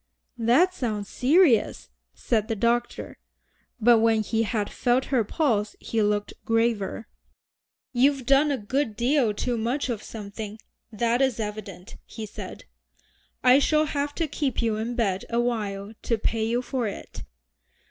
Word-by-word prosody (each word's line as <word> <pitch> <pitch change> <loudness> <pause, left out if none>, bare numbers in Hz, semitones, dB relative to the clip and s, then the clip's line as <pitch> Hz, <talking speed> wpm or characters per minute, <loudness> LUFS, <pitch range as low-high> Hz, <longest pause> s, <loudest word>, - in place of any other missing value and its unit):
"That 260 +12 +4
sounds 215 - -3
serious," 275 - +3 0.2
said 220 -3 0
the 225 - -1
doctor. 235 +3 -1 0.6
But 235 0 +6
when 225 -1 +3
he 225 +1 0
had 215 -2 -1
felt 250 +1 +1
her 245 -4 +4
pulse 215 -4 0
he 225 - -1
looked 205 0 0
graver. 225 -2 0 0.9
"You've 265 +1 +2
done 275 +3 +4
a 280 - 0
good 235 +1 -2
deal 245 0 +2
too 235 +3 -2
much 250 +5 -1
of 225 -4 -2
something, 210 0 -7 0.3
that 235 +3 +1
is 265 -4 +1
evident," 210 -3 -6
he 220 -1 -8
said. 210 - -9 0.8
"I 255 +2 +7
shall 305 +2 +3
have 285 -1 -2
to 330 - -1
keep 285 -3 -2
you 225 -2 +1
in 230 +2 -3
bed 200 -5 0
awhile 220 -4 -2
to 230 - 0
pay 220 +1 -1
you 240 +2 0
for 250 -3 -2
it." 200 - -8
230 Hz, 145 wpm, -25 LUFS, 215-255 Hz, 0.9 s, I